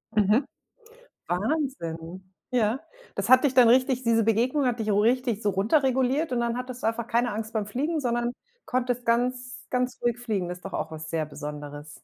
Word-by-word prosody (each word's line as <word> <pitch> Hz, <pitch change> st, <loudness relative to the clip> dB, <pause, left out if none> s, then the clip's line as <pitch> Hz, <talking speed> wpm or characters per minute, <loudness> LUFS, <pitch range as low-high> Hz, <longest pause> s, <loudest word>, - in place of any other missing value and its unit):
Mhm. 215 Hz, +6 st, +3 dB, 0.8 s
Wahnsinn, 185 Hz, -, -3 dB, 0.2 s
ja. 240 Hz, 0 st, +1 dB, 0.3 s
Das 200 Hz, +1 st, -2 dB
hat 255 Hz, +2 st, +7 dB
dich 270 Hz, -3 st, +2 dB
dann 250 Hz, -2 st, +7 dB
richtig 255 Hz, +1 st, +3 dB
diese 230 Hz, -2 st, +3 dB
Begegnung 245 Hz, +6 st, +2 dB
hat 245 Hz, -1 st, 0 dB
dich 215 Hz, -1 st, -1 dB
richtig 230 Hz, +2 st, +2 dB
so 205 Hz, -, +2 dB
runterreguliert 260 Hz, -, +2 dB
und 245 Hz, -, +1 dB
dann 235 Hz, 0 st, 0 dB
hattest 250 Hz, 0 st, -6 dB
du -, -, 0 dB
einfach 230 Hz, +1 st, -1 dB
keine 240 Hz, 0 st, +1 dB
Angst 220 Hz, +1 st, -4 dB
beim 215 Hz, -2 st, -1 dB
Fliegen, 295 Hz, +9 st, -1 dB
sondern 240 Hz, -2 st, 0 dB, 0.3 s
konntest 245 Hz, -1 st, -1 dB
ganz 250 Hz, +2 st, -1 dB
ganz 250 Hz, 0 st, -1 dB
ruhig 240 Hz, -1 st, +1 dB
fliegen. 215 Hz, -7 st, -2 dB
Das 180 Hz, 0 st, -5 dB
ist -, -, -26 dB
doch 195 Hz, -, -6 dB
auch -, -, -3 dB
was 155 Hz, 0 st, -7 dB
sehr 160 Hz, -2 st, -1 dB
Besonderes. 150 Hz, 0 st, -7 dB
235 Hz, 185 wpm, -26 LUFS, 200-255 Hz, 0.8 s, hat